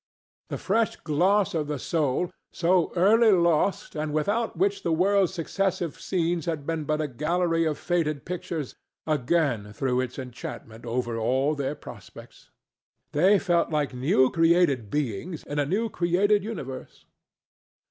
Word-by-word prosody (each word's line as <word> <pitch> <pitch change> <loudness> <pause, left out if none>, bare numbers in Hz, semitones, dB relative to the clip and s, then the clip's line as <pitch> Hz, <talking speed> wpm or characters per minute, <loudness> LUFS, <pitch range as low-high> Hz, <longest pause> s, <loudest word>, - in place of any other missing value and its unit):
The - - -3
fresh 220 +3 0
gloss 190 +6 +1
of 155 -3 -1
the 150 -1 -2
soul, 155 +3 -1 0.2
so 175 0 +2
early 220 +5 +5
lost 170 0 +2
and 155 0 -2
without 205 +9 -1
which 200 +3 +1
the 170 - -1
world's 190 +3 +3
successive 185 -1 -2
scenes 170 -3 -1
had 155 -4 -2
been 160 -1 -2
but 155 +1 0
a 155 - -1
gallery 165 +5 0
of 155 -2 -1
faded 155 -5 -1
pictures, 170 -5 -4 0.3
again 140 -7 0
threw 125 +2 0
its 130 -1 -5
enchantment 120 -2 -8
over 120 -1 -2
all 130 +6 +1
their 140 0 -2
prospects. - - -13 0.6
They 185 +7 +4
felt 175 -3 +1
like 150 -4 -1
new 130 0 +3
created 165 - +3
beings 150 - -3
in 145 0 -4
a 145 - +1
new 210 +8 0
created 195 +2 +2
universe. 135 - -7
160 Hz, 145 wpm, -26 LUFS, 140-180 Hz, 0.6 s, early